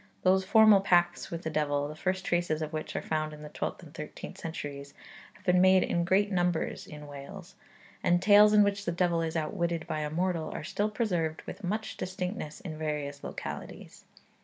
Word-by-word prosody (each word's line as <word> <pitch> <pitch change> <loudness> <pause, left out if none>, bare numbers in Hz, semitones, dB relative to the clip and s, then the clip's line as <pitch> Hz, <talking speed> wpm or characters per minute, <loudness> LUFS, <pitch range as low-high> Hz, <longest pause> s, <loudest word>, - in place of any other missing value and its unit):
Those 190 +1 +4
formal 215 0 +6
pacts 175 -2 +2
with 170 0 -5
the 160 - -3
devil, 145 -2 0
the 150 - -6
first 185 +3 -2
traces 175 -3 0
of 155 +1 -6
which 155 - -4
are - - -2
found 155 -1 -2
in 150 0 -10
the 150 - -8
twelfth 180 - -4
and 155 -3 -13
thirteenth 155 -2 -8
centuries, 145 -3 -6 0.4
have 185 - -22
been 180 -1 +4
made 185 0 +6
in 170 0 0
great 200 +3 +2
numbers 175 -3 0
in 150 -1 -9
Wales; 140 -1 -10 0.5
and 175 0 +4
tales 205 +2 +7
in 210 -1 +7
which 200 0 -1
the 175 - 0
devil 170 -1 +1
is 165 0 -2
outwitted 170 0 -1
by 155 - -3
a 150 -1 -2
mortal 170 0 -1
are - - -5
still 205 +1 -1
preserved 175 -8 -1
with 205 - -9
much 215 +4 -3
distinctness 180 -4 -4
in 155 -4 -7
various 150 -2 -3
localities. - - -7
170 Hz, 195 wpm, -29 LUFS, 155-190 Hz, 0.5 s, tales